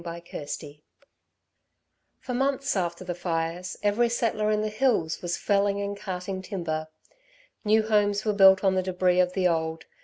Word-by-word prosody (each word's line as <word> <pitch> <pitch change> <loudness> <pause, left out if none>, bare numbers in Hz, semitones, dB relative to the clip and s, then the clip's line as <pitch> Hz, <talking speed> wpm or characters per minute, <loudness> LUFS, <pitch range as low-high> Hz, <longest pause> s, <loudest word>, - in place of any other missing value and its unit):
CHAPTER 170 0 -7
XVI 145 0 -7 1.4
For 250 - -5
months 275 +1 0
after 175 -2 -2
the 180 -1 -3
fires 170 +1 -3
every 215 +4 +2
settler 225 -2 0
in 215 0 +1
the 215 - -1
hills 215 -8 0
was 175 -1 -2
felling 200 0 +1
and 200 0 -3
carting 190 -1 -5
timber. 170 -5 -4 0.8
New 220 0 +3
homes 205 -1 +2
were 210 - +2
built 190 -1 +6
on 190 -1 +3
the 185 - +1
débris 180 -1 +2
of 180 0 0
the 185 -1 +2
old. 160 -1 -1
190 Hz, 160 wpm, -26 LUFS, 175-210 Hz, 1.4 s, built